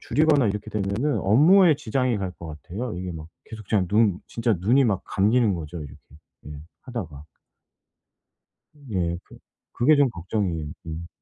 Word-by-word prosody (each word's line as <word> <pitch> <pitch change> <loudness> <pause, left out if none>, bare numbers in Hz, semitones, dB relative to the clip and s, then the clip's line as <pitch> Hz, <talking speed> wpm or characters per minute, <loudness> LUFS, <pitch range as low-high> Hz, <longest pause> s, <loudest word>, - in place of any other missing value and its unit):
줄이거나 150 -5 +2
이렇게 105 +2 -4
되면은 105 +8 -1
업무에 160 - +5
지장이 130 -3 -1
갈 95 -2 -4
것 85 -2 -10
같아요. 105 +7 -5
이게 90 0 -5
막 80 -1 -9 0.2
계속 110 -3 -11
제가 100 -4 +2
눈 105 -3 +3
진짜 115 -1 0
눈이 120 +9 +4
막 100 -5 0
감기는 105 +1 +2
거죠 85 0 -6
이렇게 75 -3 -9 0.5
예 - - -8 0.3
하다가. 95 - -7 1.7
예. 85 -2 -1
그 - - -16 0.4
그게 150 +6 +4
좀 140 -3 +4
걱정이에요. 85 -5 -3 0.2
음. 80 +1 -6
105 Hz, 305 characters per minute, -24 LUFS, 90-125 Hz, 1.7 s, 업무에